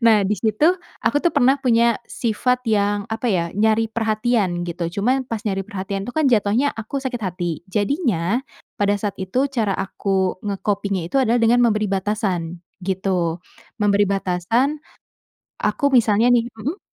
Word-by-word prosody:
Nah 225 Hz, -2 st, +7 dB
di 210 Hz, -, +2 dB
situ 220 Hz, +6 st, 0 dB, 0.4 s
aku -, -, +2 dB
tuh 345 Hz, -, +3 dB
pernah 265 Hz, +3 st, +5 dB
punya 235 Hz, -1 st, +4 dB
sifat 245 Hz, +2 st, 0 dB
yang 205 Hz, -1 st, +1 dB
apa 225 Hz, +2 st, -3 dB
ya 170 Hz, -2 st, 0 dB
nyari 220 Hz, +1 st, +2 dB
perhatian 220 Hz, -4 st, 0 dB
gitu, 170 Hz, +1 st, -5 dB, 0.2 s
cuman 255 Hz, +5 st, +1 dB
pas 230 Hz, -3 st, -4 dB
nyari 195 Hz, -3 st, -2 dB
perhatian 195 Hz, -1 st, -4 dB
tuh 245 Hz, -, -6 dB
kan 310 Hz, -, +2 dB
jatuhnya 220 Hz, +5 st, +2 dB
aku 225 Hz, +5 st, -4 dB
sakit 255 Hz, -3 st, -4 dB
hati. 180 Hz, -1 st, -3 dB, 0.3 s
Jadinya 210 Hz, -, +1 dB, 0.4 s
pada 205 Hz, 0 st, +2 dB
saat 205 Hz, -1 st, -3 dB
itu 190 Hz, +5 st, -3 dB
cara 225 Hz, -7 st, 0 dB
aku 190 Hz, +1 st, -5 dB, 0.4 s
nge-coping-nya 200 Hz, -3 st, -2 dB
itu 275 Hz, -, -2 dB
adalah 240 Hz, -2 st, +3 dB
dengan 240 Hz, +2 st, +4 dB
memberi 215 Hz, -2 st, +1 dB
batasan 190 Hz, -4 st, -2 dB, 0.2 s
gitu. 180 Hz, -3 st, -1 dB, 0.4 s
Memberi 205 Hz, 0 st, +3 dB
batasan, 195 Hz, +6 st, 0 dB, 0.9 s
aku 285 Hz, -, -1 dB
misalnya 225 Hz, +1 st, +4 dB
nih 240 Hz, -1 st, +3 dB
mmm? 285 Hz, -, -4 dB
215 Hz, 150 wpm, -21 LUFS, 195-235 Hz, 0.9 s, Nah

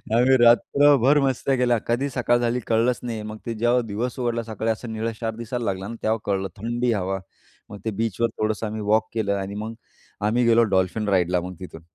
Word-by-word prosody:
आम्ही 130 Hz, +2 st, +5 dB
रात्रभर 140 Hz, +3 st, +5 dB
मस्त्या 135 Hz, 0 st, +1 dB
केल्या. 120 Hz, -1 st, +2 dB
कधी 130 Hz, +4 st, 0 dB
सकाळ 120 Hz, -1 st, +1 dB
झाली 120 Hz, +1 st, 0 dB
कळलंच 115 Hz, +2 st, +2 dB
नाही. 115 Hz, -3 st, -4 dB
मग 110 Hz, 0 st, -7 dB
ते 115 Hz, -, -3 dB
जेव्हा 120 Hz, +3 st, +2 dB
दिवस 115 Hz, +5 st, -3 dB
उघडला 120 Hz, -1 st, -1 dB
सकाळी 110 Hz, 0 st, -2 dB
असा 115 Hz, +2 st, -5 dB
निळशार 110 Hz, 0 st, -3 dB
दिसायला 120 Hz, +1 st, -4 dB
लागला 95 Hz, 0 st, -2 dB
ना 115 Hz, -, -6 dB
तेव्हा 110 Hz, +1 st, +1 dB
कळलं 95 Hz, -1 st, -1 dB
थंडी 120 Hz, +2 st, 0 dB
हवा. 95 Hz, -1 st, -2 dB, 0.5 s
मग 105 Hz, -, -9 dB
ते 110 Hz, -, 0 dB
बीचवर 115 Hz, +1 st, 0 dB
थोडंसं 110 Hz, +1 st, -1 dB
आम्ही 110 Hz, 0 st, -5 dB
वॉक 110 Hz, +2 st, +2 dB
केलं 110 Hz, -3 st, 0 dB
आणि 100 Hz, +1 st, -5 dB
मग 110 Hz, +2 st, -5 dB, 0.5 s
आम्ही 120 Hz, +3 st, +2 dB
गेलो 115 Hz, 0 st, +5 dB
डॉल्फिन 95 Hz, +3 st, 0 dB
राईडला 90 Hz, -2 st, +2 dB
मग 90 Hz, +1 st, -6 dB
तिथून. 85 Hz, -3 st, -9 dB
115 Hz, 195 wpm, -23 LUFS, 105-120 Hz, 0.5 s, आम्ही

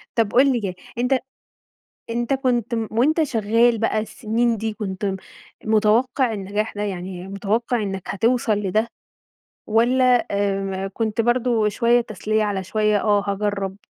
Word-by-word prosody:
طب 225 Hz, -3 st, +1 dB
قُل 270 Hz, +2 st, +5 dB
لي 240 Hz, -, -1 dB
كده 190 Hz, -3 st, -3 dB, 0.2 s
أنت 250 Hz, +2 st, +2 dB, 0.9 s
أنت 240 Hz, +3 st, -1 dB
كنت 245 Hz, -3 st, 0 dB, 0.2 s
وأنت 300 Hz, +8 st, +2 dB
شغال 230 Hz, -2 st, +2 dB
بقى 225 Hz, -1 st, 0 dB
السنين 225 Hz, +2 st, -1 dB
دي 220 Hz, +1 st, -3 dB
كنت 200 Hz, -2 st, -5 dB
م 195 Hz, -1 st, -1 dB, 0.5 s
متوقع 225 Hz, +3 st, +2 dB
النجاح 205 Hz, +2 st, -3 dB
ده 205 Hz, -, -3 dB
يعني 185 Hz, -1 st, -5 dB
متوقع 215 Hz, +4 st, -1 dB
إنك 195 Hz, -2 st, -4 dB
هتوصل 230 Hz, +2 st, +1 dB
لده، 215 Hz, +3 st, 0 dB, 0.8 s
والّا 245 Hz, +3 st, +3 dB
آآ 195 Hz, -1 st, -1 dB
كنت 220 Hz, +2 st, -1 dB
برضه 240 Hz, -2 st, +2 dB
شوية 235 Hz, +3 st, +3 dB
تسلية 215 Hz, 0 st, -1 dB
على 200 Hz, -2 st, -2 dB
شوية 210 Hz, +1 st, +1 dB
آه 205 Hz, -2 st, +2 dB
هاجرّب؟ 200 Hz, -1 st, -2 dB
215 Hz, 140 wpm, -22 LUFS, 200-240 Hz, 0.9 s, قُل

